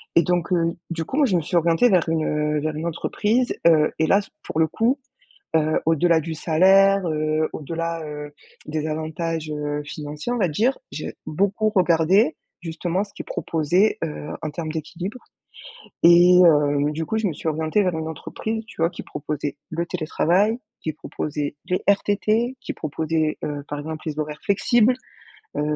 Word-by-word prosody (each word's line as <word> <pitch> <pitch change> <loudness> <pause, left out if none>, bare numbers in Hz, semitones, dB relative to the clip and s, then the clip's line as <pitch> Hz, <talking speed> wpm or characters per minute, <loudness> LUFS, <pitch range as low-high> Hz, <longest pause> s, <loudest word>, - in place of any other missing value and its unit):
Et 170 - +7
donc 175 +1 0
heu, 170 -1 +1 0.2
du 165 -1 -2
coup, 265 - -4
moi 295 - +5
je 190 - +1
me 170 - +2
suis 175 +4 -4
orientée 170 +8 +4
vers 180 -5 +3
une, 160 -1 0
heu, 150 0 0
vers 155 0 -2
une 160 +2 -4
entreprise, 220 +8 0
heu, 155 -2 +5
et 160 - +3
là 200 +4 +4
c'est 195 - -16
pour - - -3
le 160 - +5
coup, 235 - +1 0.6
heu, 155 0 +2
au-delà 165 +1 +3
du 160 +1 -5
salaire, 190 +4 +4
heu, 155 0 0
au-delà, 165 +2 -3
heu, 150 -1 -7 0.3
des 155 0 -2
avantages, 160 0 -3
heu, 150 0 -3
financiers 150 +7 -5
on 245 - 0
va 185 - +2
dire, 225 - +1
j'ai - - -5
beaucoup 200 +6 +1
regardé 185 - +3 0.2
justement 175 +3 -2
ce 200 - -19
qu'ils - - -7
proposaient, 175 +7 +1
heu, 150 -1 -6
en 155 - -2
termes 160 0 -5
d'équilibre 175 - -5 0.9
et 175 +1 +7
heu, 145 -2 +3
du 160 +1 -3
coup, 220 - -1
je 220 - -1
me 165 - -2
suis 160 - -3
orientée 160 +5 +1
vers 180 -3 0
une 160 - -3
entreprise 220 +7 -4
tu 165 - -9
vois 165 +2 +3
qui - - -7
proposait 145 0 -4
le 170 +1 -2
télétravail, 180 +6 +1 0.2
qui 155 - -2
proposait 150 -1 -4
les 180 - -1
RTT, 215 +5 +2
qui - - -5
proposait, 155 +1 -1
heu, 145 -1 -3
par 145 - -4
exemple, 155 +1 -6
les 155 -1 -4
horaires 150 0 -4
flexibles. 225 +4 +3 0.6
Heu, - - +1
165 Hz, 180 wpm, -23 LUFS, 155-190 Hz, 0.9 s, Et